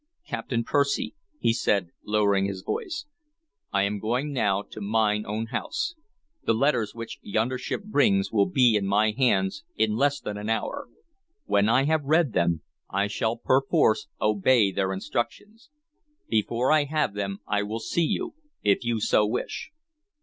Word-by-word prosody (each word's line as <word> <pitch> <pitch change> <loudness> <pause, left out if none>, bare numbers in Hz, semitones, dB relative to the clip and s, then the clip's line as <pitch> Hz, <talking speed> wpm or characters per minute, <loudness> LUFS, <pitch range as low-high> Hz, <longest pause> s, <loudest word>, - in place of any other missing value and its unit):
"Captain 115 -2 -2
Percy," 140 +3 0 0.2
he 115 - +2
said, 100 -6 0
lowering 100 -2 +2
his 95 -1 -4
voice, 370 -10 -3 0.7
"I 100 -1 +2
am 100 +1 -1
going 125 +8 -1
now 100 -6 +1
to 110 - -10
mine 105 0 +1
own 110 +2 -2
house. 435 - -2 0.5
The 115 - +2
letters 115 -4 +1
which 115 0 -7
yonder 115 +5 -1
ship 165 - -4
brings 100 - +2
will 100 -3 +3
be 125 -4 +4
in 100 -2 +1
my 105 +2 +3
hands 105 +1 +1
in 110 -1 +1
less 145 +4 +2
than 105 - -5
an 105 +1 -4
hour. 110 - -2 0.6
When 100 +1 +3
I 130 +4 +4
have 155 +1 +1
read 150 -3 +2
them, 85 -3 +1 0.3
I 100 +1 +1
shall 110 +2 -1
perforce 130 -3 +2
obey 105 0 +3
their 95 -1 0
instructions. 205 - -4 0.6
Before 115 +4 +1
I 155 -2 +4
have 150 -6 0
them 100 -1 -3
I 105 -1 +1
will 105 +2 -3
see 170 +8 0
you, 355 -2 -2 0.3
if 100 +3 +3
you 120 -1 0
so 105 0 +3
wish." 115 +4 -3
110 Hz, 160 wpm, -26 LUFS, 100-135 Hz, 0.7 s, be